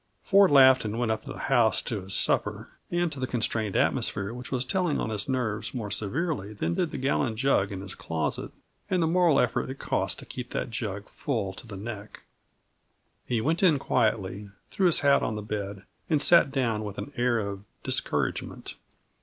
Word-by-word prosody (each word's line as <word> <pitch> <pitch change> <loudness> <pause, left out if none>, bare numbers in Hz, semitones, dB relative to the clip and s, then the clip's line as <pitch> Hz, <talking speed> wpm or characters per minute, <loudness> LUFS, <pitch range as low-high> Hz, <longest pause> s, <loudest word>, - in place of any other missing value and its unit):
Ford 200 -1 +5
laughed 130 -2 +7
and 110 0 -3
went 120 -2 0
up 110 - -3
to - - -7
the - - -7
house 120 -5 +3
to 110 -4 -3
his 95 0 0
supper, - - +2 0.2
and 175 -1 0
to 145 - -6
the 130 - -1
constrained 110 -4 -1
atmosphere 100 +2 +1
which 125 +1 -8
was 130 -1 0
telling 180 +1 0
on 110 - -2
his 105 +3 -2
nerves 120 -3 -2
more 105 -5 -4
severely 110 - -2
than 85 -5 -2
did 170 - 0
the - - -5
gallon 130 -3 0
jug 115 -6 +2
in 95 -1 -5
his 95 -1 -7
closet, 80 -2 -3 0.4
and 180 -3 +2
the - - +3
moral 165 -3 +4
effort - - 0
it 135 - -6
cost - - -1
to - - -10
keep 125 -1 -7
that - - -3
jug 100 -3 -4
full 110 -9 -3
to 115 - -9
the 100 -3 -8
neck. 105 0 -8 1.0
He 120 -3 0
went 160 +7 0
in 170 -6 +5
quietly, 105 -5 0 0.2
threw 190 - +2
his 170 - +2
hat 140 -1 +4
on 110 - -1
the 105 - -5
bed, 100 -2 -5 0.3
and 155 -3 +3
sat 170 +1 +6
down 115 -6 0
with 100 -2 -6
an 145 - -6
air 120 -1 +2
of 100 -2 -4 0.2
discouragement. - - -2
120 Hz, 200 wpm, -27 LUFS, 105-140 Hz, 1.0 s, laughed